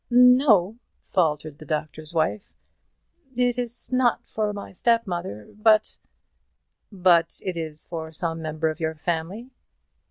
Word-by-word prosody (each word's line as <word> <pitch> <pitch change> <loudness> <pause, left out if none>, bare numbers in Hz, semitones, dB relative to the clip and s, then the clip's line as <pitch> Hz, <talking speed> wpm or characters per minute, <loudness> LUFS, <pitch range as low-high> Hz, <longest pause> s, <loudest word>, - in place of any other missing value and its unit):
"No," 245 -5 +5 0.3
faltered 155 -4 0
the 155 - -11
Doctor's 155 0 -4
Wife, 170 +5 -1 0.8
"it 245 0 +1
is 240 -1 -1
not 255 -2 +2
for 215 -1 -2
my 205 -1 -8
step 230 +5 +2
mother, 175 - -6
but 215 0 +3 0.5
" - - -51 0.2
"But 170 -1 +3
it 185 -2 -2
is 155 -2 -5
for 160 -2 -6
some 165 0 -3
member 155 0 -1
of 155 +1 -5
your 160 -1 -2
family?" 175 +10 -4
175 Hz, 135 wpm, -24 LUFS, 160-225 Hz, 0.8 s, No